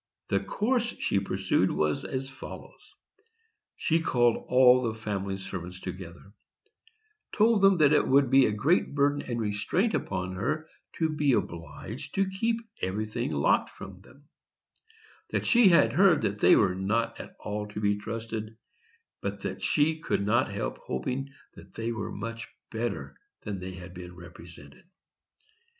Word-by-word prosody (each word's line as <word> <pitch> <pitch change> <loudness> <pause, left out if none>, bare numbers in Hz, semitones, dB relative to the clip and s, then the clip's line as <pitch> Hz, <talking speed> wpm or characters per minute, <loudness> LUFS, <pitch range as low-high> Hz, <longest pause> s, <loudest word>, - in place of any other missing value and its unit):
The - - +2
course 240 +2 -1
she 100 - +1
pursued 95 -1 +1
was 75 -1 0
as 135 0 -4
follows: 135 - -11 0.8
She 165 +1 +1
called 120 -6 +2
all 125 0 +6
the 115 -3 -2
family 100 -3 -3
servants 90 -1 -7
together; 90 +1 -9 1.0
told 220 -1 +4
them 195 -1 +6
that 150 -2 +5
it - - +3
would 135 -1 +4
be 135 -1 +6
a - - 0
great 140 - +1
burden 145 0 +2
and 120 -1 -4
restraint 110 - 0
upon 95 0 -2
her 145 +12 -2 0.3
to 160 - 0
be 150 -3 +1
obliged 85 - -4
to 195 0 +2
keep 225 +5 -1 0.2
everything 110 +5 -2
locked 70 -2 +2
from 95 -1 -11
them; 140 +8 -20 1.0
that - - -1
she 240 -3 +6
had 170 - +5
heard 175 -5 +5
that 100 +1 -1
they 90 - +6
were 90 - +3
not 105 +5 -1
at - - -9
all 105 0 -4
to 105 0 -7
be 105 -1 +2
trusted, 110 0 -5 0.6
but - - -4
that - - -5
she 155 +1 +2
could 100 -10 -1
not 120 +5 +2
help 100 - -4
hoping 125 - -3 0.2
that - - -15
they 115 +1 -2
were 110 -3 -4
much 115 0 -6 0.2
better 85 -12 -4 0.2
than 100 -2 -4
they 95 +1 -6
had 90 0 -10
been 90 0 -9
represented. 85 - -13
110 Hz, 155 wpm, -28 LUFS, 95-145 Hz, 1.0 s, all